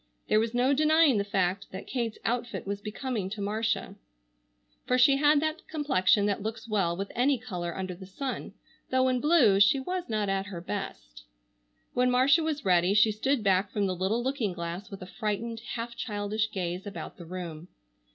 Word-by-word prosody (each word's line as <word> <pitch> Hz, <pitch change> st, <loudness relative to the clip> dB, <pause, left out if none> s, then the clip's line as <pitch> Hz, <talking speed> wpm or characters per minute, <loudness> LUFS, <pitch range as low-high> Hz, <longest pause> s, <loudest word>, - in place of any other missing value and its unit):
There 215 Hz, -, +5 dB
was 225 Hz, +2 st, -1 dB
no 255 Hz, +3 st, +3 dB
denying 310 Hz, -4 st, +4 dB
the -, -, +1 dB
fact 195 Hz, -1 st, -1 dB
that 190 Hz, -, -8 dB
Kate's 235 Hz, -4 st, -3 dB
outfit 240 Hz, 0 st, -2 dB
was 200 Hz, +1 st, -4 dB
becoming 215 Hz, -2 st, -3 dB
to 210 Hz, +2 st, -6 dB
Marcia, 215 Hz, 0 st, -1 dB, 0.9 s
for 250 Hz, -, +3 dB
she 275 Hz, +2 st, +6 dB
had 295 Hz, +1 st, +5 dB
that 310 Hz, +1 st, -3 dB
complexion 245 Hz, -, +2 dB
that 205 Hz, -1 st, 0 dB
looks 220 Hz, +2 st, -5 dB
well 190 Hz, -6 st, 0 dB
with 195 Hz, +1 st, -4 dB
any 265 Hz, +3 st, +2 dB
color 180 Hz, -8 st, -5 dB
under 185 Hz, -1 st, -3 dB
the 185 Hz, +1 st, -11 dB
sun, 260 Hz, +7 st, -5 dB, 0.3 s
though 260 Hz, 0 st, +3 dB
in 255 Hz, -1 st, +1 dB
blue 265 Hz, -, +5 dB
she 205 Hz, +7 st, +5 dB
was 360 Hz, +4 st, -4 dB
not 215 Hz, -2 st, 0 dB
at 195 Hz, 0 st, -1 dB
her 185 Hz, -4 st, -6 dB
best. -, -, -6 dB, 0.7 s
When 250 Hz, 0 st, +2 dB
Marcia 260 Hz, +6 st, +4 dB
was 305 Hz, -5 st, -2 dB
ready 180 Hz, +1 st, +3 dB
she 215 Hz, +1 st, +5 dB
stood 235 Hz, +3 st, 0 dB
back 195 Hz, 0 st, +2 dB
from 205 Hz, 0 st, -1 dB
the 185 Hz, -1 st, -1 dB
little 195 Hz, +7 st, 0 dB
looking 255 Hz, -7 st, -1 dB
glass, 170 Hz, +3 st, -5 dB
with 195 Hz, -2 st, -8 dB
a 185 Hz, -, -12 dB
frightened, 225 Hz, +1 st, -2 dB, 0.2 s
half 235 Hz, 0 st, -5 dB
childish 210 Hz, 0 st, -2 dB
gaze 185 Hz, -1 st, -4 dB
about 200 Hz, -, -7 dB
the 170 Hz, -, -10 dB
room. 170 Hz, -2 st, -7 dB
215 Hz, 190 wpm, -28 LUFS, 190-250 Hz, 0.9 s, she